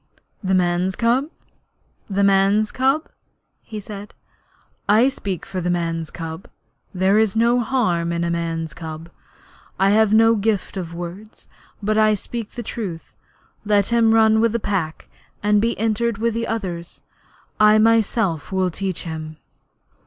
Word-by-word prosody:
'The 190 0 +1
man's 180 +1 +1
cub 245 +5 +1 0.8
the 200 0 +1
man's 200 +2 +3
cub?' 270 +4 +1 0.5
he 215 - -7
said. 205 0 -9 0.7
'I 225 +6 +5
speak 195 -9 -5
for 190 -1 -4
the 175 - -1
man's 165 -2 -1
cub. 165 +2 -7 0.4
There 190 +2 +2
is 220 -1 +1
no 235 +2 +3
harm 185 -9 0
in 170 0 -1
a 170 - -1
man's 165 -2 -3
cub. 160 +1 -8 0.7
I 195 +1 +4
have 215 0 +4
no 225 +1 +5
gift 210 -2 -1
of 170 -3 -5
words, 175 +5 -9 0.4
but 215 +1 +1
I 215 0 +4
speak 225 +2 -6
the 240 - -6
truth. 195 -7 -6 0.5
Let 205 -2 +2
him 230 -1 +4
run 220 0 +5
with 230 -1 +2
the 235 - 0
Pack, 190 -7 -3 0.4
and 210 0 +3
be 230 +1 0
entered 225 +1 0
with 230 +2 0
the 230 +1 -2
others. 180 -6 -5 0.6
I 215 0 +6
myself 215 -7 +2
will 185 -1 0
teach 190 0 -3
him.' 155 -2 -6
200 Hz, 150 wpm, -21 LUFS, 175-225 Hz, 0.8 s, I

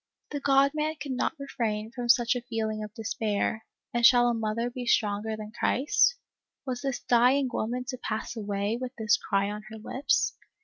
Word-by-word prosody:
" - - -45
The 290 - -2
God 275 0 +4
Man 310 +1 -1
could 280 - -5
not 255 - -1
refrain 225 -6 -3
from 240 0 -5
such 240 +1 +5
a 245 - -2
feeling 220 -3 -3
of 210 - -7
despair, 220 -1 -2 0.3
and 240 0 0
shall 240 0 +7
a - - +1
mother 225 +1 -1
be 245 0 -6
stronger 215 -1 +1
than 215 0 -8
Christ? 270 - +2 0.5
Was 250 -2 -3
this 270 -3 -2
dying 250 +3 +4
woman 245 +3 -2
to 255 - -3
pass 220 +1 -4
away, 205 +1 -2
with 255 0 -4
this 220 -2 +3
cry 200 +1 0
on 210 0 -5
her 220 - -8
lips 260 +5 0
235 Hz, 190 wpm, -28 LUFS, 215-255 Hz, 0.5 s, shall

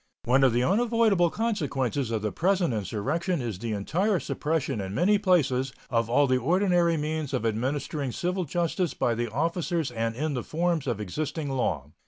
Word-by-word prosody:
One 130 +3 +3
of 130 - +5
the 120 +2 +1
unavoidable 215 - +3
consequences 140 - -1
of 110 -2 -2
the 105 - -1
present 180 - +1
insurrection 135 - -1
is 115 -7 -4
the 115 0 -3
entire 180 - 0
suppression 145 -4 -2
in 95 +1 -5
many 205 +4 +3
places 135 -10 +2 0.2
of 115 -2 +1
all 145 +4 +4
the 130 -1 +2
ordinary 175 - +2
means 150 -2 -2
of 120 - -2
administering 135 +5 -1
civil 180 +6 -2
justice 175 +2 -1
by 120 - +1
the 120 +1 -2
officers 165 - -1
and 115 -1 -2
in 150 +3 -2
the 125 - -2
forms 165 -2 -1
of 120 -4 -1
existing 145 - -3
law. 75 - -1
145 Hz, 175 wpm, -27 LUFS, 120-175 Hz, 0.2 s, of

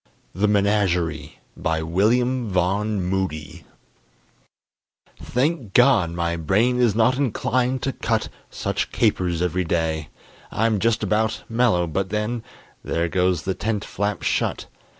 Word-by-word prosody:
THE 100 +4 +1
MENAGERIE 90 -7 +1 0.2
BY 80 0 -1
WILLIAM 120 +8 +1
VAUGHN 95 +2 0
MOODY 90 -3 -3 1.6
Thank 130 - -1
God 125 -9 +5
my 85 0 -2
brain 110 +10 +2
is 120 -4 +3
not 125 +3 +3
inclined 130 0 0
to 135 - -1
cut - - -1 0.2
Such - - -3
capers 90 -2 +1
every 90 +1 0
day! 80 -2 -1 0.4
I'm 110 -1 +1
just 115 +1 +1
about 110 +2 0
Mellow, 115 -7 +2
but 95 +4 -2
then 105 +3 -2 0.4
There 85 +1 -1
goes 90 -1 +1
the 95 - -1
tent 105 +1 -2
flap 100 +1 -3
shut. - - 0
100 Hz, 125 wpm, -23 LUFS, 85-115 Hz, 1.6 s, God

